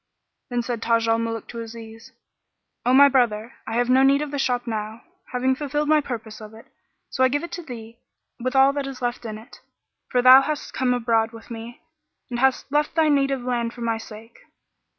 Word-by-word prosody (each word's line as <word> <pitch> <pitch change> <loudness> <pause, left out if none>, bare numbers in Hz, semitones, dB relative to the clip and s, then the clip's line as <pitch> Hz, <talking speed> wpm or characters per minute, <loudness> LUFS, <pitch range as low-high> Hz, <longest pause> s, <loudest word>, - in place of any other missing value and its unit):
Then 245 -1 -1
said 235 -2 -4
Taj 230 -1 +1
al 225 0 +2
Muluk 225 -1 -4
to 235 - -7
Aziz, 225 0 -10 0.8
"O - - +4
my 280 +2 +8
brother, 240 -4 +1
I 225 - -4
have 240 +1 +1
no 255 +1 +4
need 275 +2 +4
of 295 - -6
the 285 - -3
shop 245 -2 0
now, 220 -1 -5 0.3
having 255 +1 +1
fulfilled 295 +2 -2
my 305 0 +4
purpose 225 -5 -7
of 215 +1 -11
it; 225 - -14 0.5
so 260 - +1
I - - +6
give 290 +4 -1
it 340 - -7
to 350 - -5
thee 235 -6 -10 0.4
with 255 +2 -3
all 270 +1 +5
that 280 -1 -3
is 270 -2 -7 0.2
in 215 -2 -6
it; 225 +5 -15 0.5
for 250 -1 +1
that - - +2
thou 260 +1 +10
hast 300 +1 -4
come 250 -1 +1
abroad 225 -1 +1
with 230 +1 -13
me 230 +1 -8 0.5
and 240 - -2
hast 265 +1 +1
left 295 +1 0
thy 320 -2 +3
native 275 -3 +1
land 240 -2 -2
for 240 - -11
my 230 -1 -1
sake." 225 +1 -12
245 Hz, 210 wpm, -23 LUFS, 230-270 Hz, 0.8 s, thou